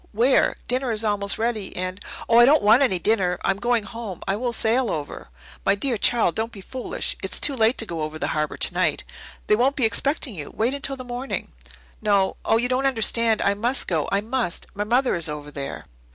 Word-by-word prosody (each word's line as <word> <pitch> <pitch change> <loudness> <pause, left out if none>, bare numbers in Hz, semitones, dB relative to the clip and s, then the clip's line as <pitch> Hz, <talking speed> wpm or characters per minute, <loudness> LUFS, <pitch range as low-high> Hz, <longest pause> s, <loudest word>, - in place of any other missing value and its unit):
Where? 240 +5 +3
Dinner 255 0 -1
is 220 0 -3
almost 205 -2 0
ready, 220 -3 -2
and 185 +2 -4
" - - -11
"Oh, 230 0 +5
I 240 - +9
don't 295 0 +4
want 220 +5 +6
any 215 -9 +3
dinner. 180 -2 +1
I'm 195 0 0
going 240 0 +1
home 215 -4 -7
I 195 - +1
will 240 +3 -2
sail 235 +1 +1
over." 145 - -5 0.3
"My 195 - +3
dear 245 +4 0
child, 220 -4 +2
don't 225 +1 -2
be 210 - -10
foolish. 255 +6 -4
It's - - -2
too 285 - +2
late 225 +1 +3
to 225 - +2
go 170 -5 -5
over 155 +1 -4
the - - -2
harbour 150 -1 -2
tonight. - - +1 0.4
They 210 - +4
won't 260 +5 +2
be 260 - +2
expecting 265 +4 0
you. 150 -6 -7
Wait 235 +4 +1
until 280 -1 -3
the 255 - -7
morning." 245 +2 -5 0.5
"No 200 -3 +2
oh, 225 - +3
you 240 +2 0
don't 255 +2 +1
understand. 230 -3 +3
I 200 - +3
must 235 +6 -1
go 160 -4 -1
I 200 - +2
must! 230 -5 -2
My 205 +1 -3
mother 250 +4 +2
is 165 -2 -3
over 150 -1 -6
there." 140 -1 -6
220 Hz, 220 wpm, -23 LUFS, 195-245 Hz, 0.5 s, I